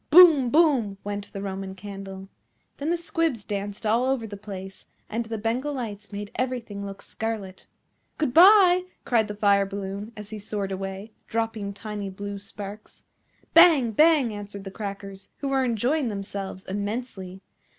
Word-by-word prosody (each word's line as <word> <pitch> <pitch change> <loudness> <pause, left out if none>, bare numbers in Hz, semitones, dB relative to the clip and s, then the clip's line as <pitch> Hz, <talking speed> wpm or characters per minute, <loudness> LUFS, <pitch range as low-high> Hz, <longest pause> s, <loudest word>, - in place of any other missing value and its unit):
Boom! 310 -6 +8
Boom! 270 -10 +3
went 205 0 -5
the 195 - -6
Roman 190 -1 -5
Candle. 195 0 -8 0.5
Then 290 +3 -2
the 345 - +2
Squibs 330 - -1
danced 205 +1 -4
all 225 +3 +3
over 260 -3 0
the 205 -2 -7
place, 195 -2 -9 0.2
and 230 +2 -2
the 225 0 -4
Bengal 245 +7 -1
Lights 210 -5 -6
made 205 0 -6
everything 240 -6 -3
look 195 0 -7
scarlet. 215 -4 -5 0.5
"Good 300 -6 0
bye," 365 0 +7 0.2
cried 225 -3 +2
the 210 - -5
Fire 200 -1 +3
balloon 200 +2 -5
as 210 0 -9
he 215 - -5
soared 205 -1 -3
away, 195 +2 -5 0.2
dropping 225 -3 -2
tiny 205 -1 -5
blue 200 +1 -6
sparks. 205 +1 -9 0.5
Bang! 325 -9 +7
Bang! 295 -2 +4
answered 205 -1 -7
the 195 - -7
Crackers, 200 -1 -7
who 280 - -3
were 270 -1 +2
enjoying 250 +4 +1
themselves 195 -2 -5
immensely. 200 -2 -4
210 Hz, 155 wpm, -26 LUFS, 200-250 Hz, 0.5 s, Boom